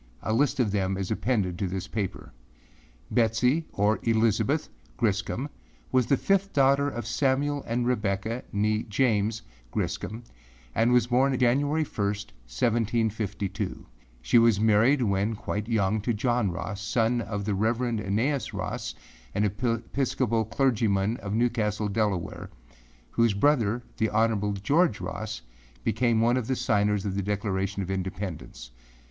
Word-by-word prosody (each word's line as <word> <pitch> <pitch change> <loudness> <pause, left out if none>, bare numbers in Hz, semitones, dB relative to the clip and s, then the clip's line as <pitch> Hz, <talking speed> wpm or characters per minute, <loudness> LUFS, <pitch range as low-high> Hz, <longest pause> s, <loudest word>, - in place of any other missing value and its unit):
A 110 - 0
list 140 +3 +2
of 115 -5 +2
them 95 -1 0
is 95 0 -3
appended 105 -6 0
to 100 - 0
this 95 +2 -4
paper. 105 -4 -4 0.8
Betsey 125 +7 +2
or 105 +2 +1
Elizabeth 115 +6 +1 0.3
Griscom 110 +4 0 0.4
was 130 -2 +3
the 140 - +3
fifth 195 +4 +1
daughter 140 +1 +4
of 120 -4 -5
Samuel 140 +1 0
and 120 +1 0
Rebecca 110 -1 -1 0.5
(James) 110 -1 +1 0.3
Griscom 110 - -3 0.5
and 115 +2 +3
was 125 -1 +4
born 130 +2 +2
January 140 +6 +2
1, - - -11
1752. 105 - -2 0.4
She 90 - +5
was 115 -3 +4
married 110 +5 +4
when 100 +1 0
quite 105 0 -4
young 105 -2 +1
to 115 +2 -1
John 120 -1 +1
Ross, 95 +3 -5
son 115 +3 +1
of 105 -3 -4
the 105 - 0
Reverend 115 +2 0
Aeneas 115 +8 -1
Ross, - - -4 0.4
an 100 - +2
Episcopal 115 +2 0
clergyman 110 -4 +1
of 100 -2 -4
Newcastle, 110 -3 0
Delaware, 100 -4 -2 0.6
whose 115 -3 +2
brother, 120 -2 +2
the 110 - +1
Hon. 105 -2 +1
George 150 - +3
Ross, - - -5 0.4
became 115 0 +2
one 120 +2 +3
of 120 -3 -2
the 130 - +1
signers 105 -3 +1
of 100 - -1
the 100 - -1
Declaration 100 -1 -2
of 95 - -4
Independence. 95 -10 -5
110 Hz, 135 wpm, -27 LUFS, 100-125 Hz, 0.8 s, She